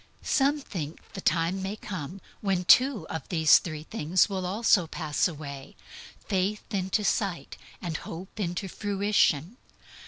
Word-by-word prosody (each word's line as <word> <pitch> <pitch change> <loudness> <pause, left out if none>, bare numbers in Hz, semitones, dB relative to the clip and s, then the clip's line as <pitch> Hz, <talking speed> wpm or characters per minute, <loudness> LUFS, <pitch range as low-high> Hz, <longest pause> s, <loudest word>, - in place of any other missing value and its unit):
Some 285 +1 +2
think 165 - -6
the 195 - -6
time 170 +3 +1
may 195 +2 -3
come 185 -3 -7 0.2
when 190 -3 0
two 250 - +5
of 160 -4 -5
these 160 -4 +6
three 155 -3 -6
things 175 -1 +1
will 190 -3 -3
also 200 -3 +3
pass 155 0 0
away 145 -4 -8 0.5
faith 195 +2 0
into 190 +2 0
sight, 195 -3 -1 0.4
hope 185 +5 -9
into 180 0 -2
fruition. 200 - +1
185 Hz, 130 wpm, -27 LUFS, 165-205 Hz, 0.5 s, these